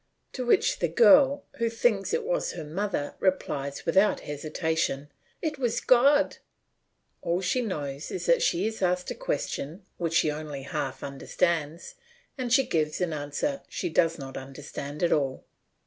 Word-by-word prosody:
To 255 Hz, -, -3 dB
which 240 Hz, -, +3 dB
the 170 Hz, -, +2 dB
girl, 265 Hz, -, +6 dB
who 230 Hz, -2 st, +1 dB
thinks 230 Hz, -3 st, +1 dB
it 470 Hz, +1 st, 0 dB
was -, -, -1 dB
her 170 Hz, -, -6 dB
mother, 170 Hz, -1 st, -2 dB
replies 140 Hz, -7 st, -1 dB
without 190 Hz, +5 st, +3 dB
hesitation, 150 Hz, -1 st, -2 dB, 0.3 s
"It 305 Hz, -3 st, -2 dB
was 245 Hz, -3 st, 0 dB
God." 280 Hz, +4 st, +4 dB, 0.8 s
All 170 Hz, +1 st, 0 dB
she 220 Hz, +7 st, 0 dB
knows 145 Hz, -, -4 dB
is 380 Hz, -, -4 dB
that -, -, +4 dB
she 350 Hz, -7 st, +2 dB
is 220 Hz, -1 st, -3 dB
asked 180 Hz, -1 st, 0 dB
a -, -, -1 dB
question 200 Hz, -, -4 dB
which 165 Hz, -1 st, -2 dB
she 155 Hz, -, +4 dB
only 150 Hz, -2 st, -6 dB
half 135 Hz, -1 st, -4 dB
understands 160 Hz, -, -1 dB, 0.4 s
and 255 Hz, -3 st, -3 dB
she 270 Hz, +1 st, +5 dB
gives 155 Hz, -2 st, 0 dB
an 180 Hz, -3 st, 0 dB
answer 150 Hz, -, -2 dB
she 175 Hz, -, -3 dB
does 165 Hz, 0 st, +2 dB
not 135 Hz, -3 st, -7 dB
understand 140 Hz, +2 st, -7 dB
at 170 Hz, -, +3 dB
all. 135 Hz, -3 st, -1 dB
170 Hz, 160 wpm, -27 LUFS, 150-240 Hz, 0.8 s, girl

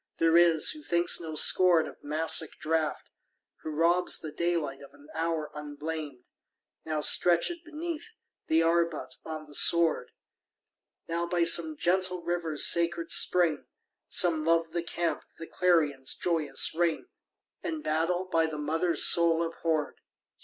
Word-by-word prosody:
There 165 Hz, 0 st, +2 dB
is, 170 Hz, -2 st, +4 dB
who 305 Hz, -, -8 dB
thinks 170 Hz, -9 st, 0 dB
no 160 Hz, -2 st, -7 dB
scorn 175 Hz, 0 st, +4 dB
of -, -, -14 dB
Massic 155 Hz, +1 st, +1 dB
draught, 160 Hz, -1 st, -3 dB, 0.5 s
Who -, -, -9 dB
robs 170 Hz, +4 st, +1 dB
the 155 Hz, -, -7 dB
daylight 155 Hz, -4 st, -3 dB
of 140 Hz, 0 st, -15 dB
an 145 Hz, +1 st, -20 dB
hour 165 Hz, -1 st, -3 dB
unblamed, 150 Hz, -2 st, -8 dB, 0.6 s
Now 155 Hz, -1 st, -3 dB
stretch'd 180 Hz, -, +3 dB
beneath 325 Hz, +3 st, -7 dB, 0.4 s
the 160 Hz, +1 st, +2 dB
arbute 170 Hz, -1 st, -1 dB
on 155 Hz, -1 st, -7 dB
the 150 Hz, -, -17 dB
sward, 170 Hz, +2 st, +4 dB, 1.0 s
Now 170 Hz, +1 st, -3 dB
by 175 Hz, 0 st, 0 dB
some 160 Hz, -2 st, +2 dB
gentle 180 Hz, +1 st, 0 dB
river's 165 Hz, -3 st, -1 dB
sacred 170 Hz, 0 st, 0 dB
spring; 170 Hz, -5 st, +2 dB, 0.4 s
Some 165 Hz, -3 st, +3 dB
love 165 Hz, 0 st, 0 dB
the 170 Hz, -, -3 dB
camp, 170 Hz, 0 st, -3 dB, 0.2 s
the 165 Hz, -, -9 dB
clarion's 150 Hz, -8 st, 0 dB
joyous 155 Hz, -6 st, -1 dB
ring, 170 Hz, -, -1 dB, 0.6 s
And 320 Hz, -2 st, -5 dB
battle, 165 Hz, +4 st, -1 dB
by 165 Hz, -3 st, 0 dB
the 155 Hz, -1 st, -7 dB
mother's 160 Hz, +3 st, +2 dB
soul 170 Hz, -1 st, +5 dB
abhorr'd. 160 Hz, -3 st, -4 dB
165 Hz, 140 wpm, -27 LUFS, 155-175 Hz, 1.0 s, soul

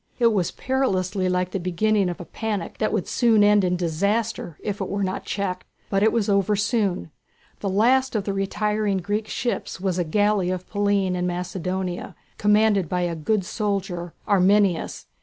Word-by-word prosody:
It 235 Hz, -2 st, +4 dB
was 185 Hz, -5 st, +1 dB
perilously 195 Hz, -8 st, 0 dB
like 180 Hz, 0 st, 0 dB
the 195 Hz, -, -2 dB
beginning 190 Hz, +3 st, +1 dB
of 175 Hz, -, -5 dB
a 175 Hz, -, -7 dB
panic 210 Hz, -4 st, -4 dB
that 215 Hz, -, +1 dB
would 215 Hz, -4 st, -1 dB
soon 225 Hz, -4 st, +4 dB
end 205 Hz, -1 st, +5 dB
in 180 Hz, -1 st, +1 dB
disaster 185 Hz, +1 st, -1 dB
if 205 Hz, -1 st, -3 dB
it 190 Hz, -, -2 dB
were 200 Hz, 0 st, -1 dB
not 185 Hz, 0 st, -3 dB
checked. 185 Hz, -2 st, -3 dB, 0.2 s
But 195 Hz, -1 st, +2 dB
it 220 Hz, +1 st, +4 dB
was 230 Hz, -3 st, +1 dB
soon 205 Hz, 0 st, +1 dB
over. 85 Hz, -, -10 dB, 0.5 s
The 200 Hz, -, -2 dB
last 250 Hz, +6 st, +3 dB
of 210 Hz, -, +1 dB
the 200 Hz, -, -2 dB
retiring 205 Hz, +1 st, 0 dB
Greek 205 Hz, +4 st, -2 dB
ships 240 Hz, -5 st, -3 dB
was 185 Hz, -1 st, -1 dB
a -, -, +2 dB
galley 205 Hz, +2 st, +1 dB
of 185 Hz, 0 st, -3 dB
Pallene 200 Hz, -2 st, +1 dB
in 180 Hz, 0 st, -1 dB
Macedonia, 180 Hz, +1 st, -3 dB, 0.2 s
commanded 210 Hz, -4 st, +3 dB
by 180 Hz, 0 st, 0 dB
a 175 Hz, -1 st, -1 dB
good 190 Hz, +5 st, 0 dB
soldier, 190 Hz, -5 st, -3 dB
Arminias. 195 Hz, -2 st, +2 dB
195 Hz, 175 wpm, -24 LUFS, 180-210 Hz, 0.5 s, end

